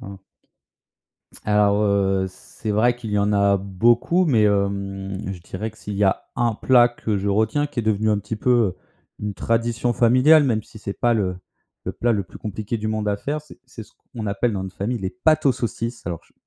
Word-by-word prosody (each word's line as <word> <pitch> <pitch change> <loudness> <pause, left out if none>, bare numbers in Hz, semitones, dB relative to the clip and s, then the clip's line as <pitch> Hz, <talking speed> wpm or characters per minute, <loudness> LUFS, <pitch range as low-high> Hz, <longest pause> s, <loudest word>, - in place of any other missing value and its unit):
Hein. 100 0 -9 1.3
Alors, 105 0 +3
heu, 95 -2 +2
c'est 105 +3 -8
vrai 120 +4 +3
qu'il 115 -3 -7
y 105 - +1
en 105 +1 +1
a 100 0 +3
beaucoup, 120 - +2
mais 125 -10 +3
hem, 100 -1 -1
je 90 - -9
dirais 100 +6 -5
que 110 - -21
s'il 105 - -6
y 100 +1 +2
a 95 - 0
un 120 -3 +1
plat 120 +1 +5
que 110 -3 -3
je 100 +1 -2
retiens, 110 +9 +1
qui 130 -4 -3
est - - -6
devenu 110 0 +1
un 105 - +2
petit 105 +2 -5
peu, 125 - 0
heu, 110 -7 +2 0.4
une 105 -1 -4
tradition 115 +4 0
familiale, 130 +7 +5
même 115 -5 +1
si 110 - -14
c'est 100 -1 -5
pas 120 -1 +3
le 95 -4 -1 0.5
le - - -2
plat 120 0 0
le 100 -3 0
plus 90 - -13
compliqué 110 +2 -4
du 110 0 -3
monde 110 -1 -1
à 100 - 0
faire, 150 +5 -3
c'est 150 - -16
c'est 115 -3 -10
ce - - -18 0.2
qu'on 110 -2 -4
appelle 105 +3 0
dans 95 - -3
notre 95 0 -7
famille 115 +5 -2
«les 95 -1 -3
pâtes 155 +7 +2
aux 135 - +5
saucisses». 115 -2 -4
Alors 85 -2 -4
je - - -29
105 Hz, 220 wpm, -22 LUFS, 100-120 Hz, 1.3 s, plat